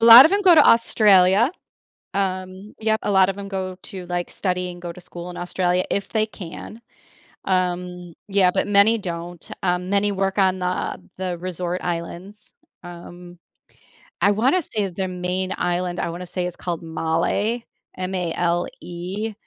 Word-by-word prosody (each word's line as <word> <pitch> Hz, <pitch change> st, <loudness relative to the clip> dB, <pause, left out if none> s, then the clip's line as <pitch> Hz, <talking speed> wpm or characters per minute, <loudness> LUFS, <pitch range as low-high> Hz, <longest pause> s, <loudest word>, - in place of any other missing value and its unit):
A 230 Hz, -, +3 dB
lot 235 Hz, +3 st, +12 dB
of 320 Hz, -, +4 dB
'em 405 Hz, 0 st, +2 dB
go 360 Hz, -3 st, +7 dB
to 300 Hz, -, +7 dB
Australia. 210 Hz, -1 st, +5 dB, 0.6 s
Um, 185 Hz, +1 st, -3 dB
yep, 220 Hz, 0 st, +1 dB
a -, -, -1 dB
lot 190 Hz, -1 st, +5 dB
of 195 Hz, -, -3 dB
'em 200 Hz, 0 st, -6 dB
go 185 Hz, -1 st, -4 dB
to, 185 Hz, -2 st, -8 dB
like, 175 Hz, 0 st, -3 dB
study 180 Hz, -1 st, -2 dB
and 175 Hz, -, -10 dB
go 175 Hz, -1 st, -5 dB
to 180 Hz, -, -13 dB
school 175 Hz, 0 st, -8 dB
in 175 Hz, -, -9 dB
Australia, 180 Hz, 0 st, 0 dB
if 200 Hz, -1 st, -1 dB
they 215 Hz, -1 st, +1 dB
can. 210 Hz, +2 st, -9 dB, 0.6 s
Um, 180 Hz, -2 st, -2 dB
yeah, 195 Hz, -2 st, +4 dB
but -, -, 0 dB
many 205 Hz, +3 st, +4 dB
don't, 175 Hz, -2 st, -6 dB
um, 180 Hz, 0 st, 0 dB
many 200 Hz, +1 st, +2 dB
work 195 Hz, 0 st, -1 dB
on 190 Hz, -1 st, +3 dB
the 180 Hz, 0 st, -2 dB, 0.2 s
the 180 Hz, -2 st, -3 dB
resort 180 Hz, 0 st, -3 dB
islands. 175 Hz, +4 st, -5 dB, 0.4 s
Um, 175 Hz, 0 st, -11 dB, 0.8 s
I 200 Hz, -, +5 dB
wanna 255 Hz, -, +2 dB
say 210 Hz, -, -2 dB
their 190 Hz, +1 st, -3 dB
main 185 Hz, +1 st, -2 dB
island, 175 Hz, 0 st, -1 dB
I -, -, -1 dB
wanna 175 Hz, +2 st, -6 dB
say 180 Hz, 0 st, -3 dB
is 180 Hz, -, -7 dB
called 175 Hz, -2 st, -4 dB
Malé, 165 Hz, +8 st, -1 dB, 0.3 s
M-A-L-E, 180 Hz, +2 st, -2 dB
185 Hz, 165 wpm, -22 LUFS, 175-200 Hz, 0.8 s, lot